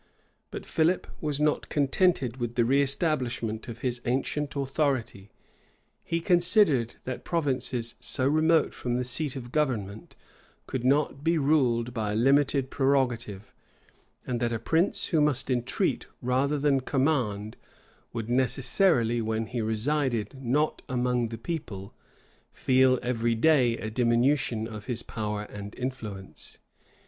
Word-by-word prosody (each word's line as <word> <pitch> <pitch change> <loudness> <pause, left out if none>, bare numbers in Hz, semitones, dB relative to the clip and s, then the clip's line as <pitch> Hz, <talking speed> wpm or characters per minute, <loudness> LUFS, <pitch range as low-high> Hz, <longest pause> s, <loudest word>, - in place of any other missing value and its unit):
But - - -7
Philip 165 +3 +1 0.2
was 150 -2 -1
not 150 0 0
contented 140 -3 +1
with 120 -2 -4
the 120 - +3
reëstablishment 130 -4 0
of 120 -1 -8
his 125 -2 -2
ancient 135 +4 -2
authority: 135 -7 -1 0.7
he 165 - -1
considered 175 - +3
that 130 -1 -5
provinces 130 -7 -1
so 130 - 0
remote 155 +2 +3
from 120 -1 -3
the 125 - -1
seat 125 +3 -1
of 120 -2 -7
government 110 -9 -2 0.5
could 130 - -4
not 140 +1 +1
be 165 +1 +2
ruled 125 -5 +2
by 105 -3 -2
a - - -2
limited 135 +2 +2
prerogative; 125 -7 0 0.7
and 125 -2 -2
that 120 0 0
a 115 - -1
prince 160 - +1
who 160 -3 +2
must 140 -3 +1
entreat 120 -1 -1
rather 130 +4 +1
than 140 -1 +2
command, 125 -7 -1 0.6
would 115 -2 -4
necessarily, 125 - +2
when 110 0 -1
he 120 +1 -4
resided 115 +2 -1
not 145 +6 0
among 125 -1 0
the 115 0 -7
people, 115 - -6 0.6
feel 130 0 +3
every 120 -1 0
day 125 -2 +3
a 110 - -5
diminution 120 0 +1
of 105 -2 -8
his 120 -2 -2
power 105 -2 -4
and 105 0 -9
influence. 110 -7 -7
125 Hz, 135 wpm, -27 LUFS, 115-145 Hz, 0.7 s, the